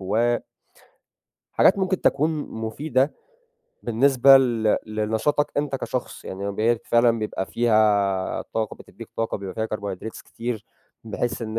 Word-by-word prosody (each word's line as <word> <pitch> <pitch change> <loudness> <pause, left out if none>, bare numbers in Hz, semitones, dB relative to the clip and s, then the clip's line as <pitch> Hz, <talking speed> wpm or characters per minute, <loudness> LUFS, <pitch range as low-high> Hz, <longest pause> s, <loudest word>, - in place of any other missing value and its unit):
و 115 +5 +1 1.1
حاجات 195 - +4
ممكن 190 -1 0
تكون 150 +3 +2 0.2
مفيدة 130 +5 -1 0.7
بالنسبة 135 +3 +5
ل 115 -5 +2
لنشاطك 110 +7 0
أنت 145 -2 0
كشخص، 125 -2 -5
يعني 95 - -7
فما 100 0 -2
بالك 110 +3 0
فعلًا 120 -1 +3
بيبقى 105 -3 -3
فيها 105 -5 +2
طاقة 110 -1 -4
بتدّيك - - -12
طاقة 115 0 -1
بيبقى 95 -2 -7
فيها 110 0 -2
Carbohydrates 100 +1 -6
كتير 115 -2 -5 0.4
بحيث 115 +2 -3
إن 110 0 -3
115 Hz, 130 wpm, -24 LUFS, 110-130 Hz, 1.1 s, بالنسبة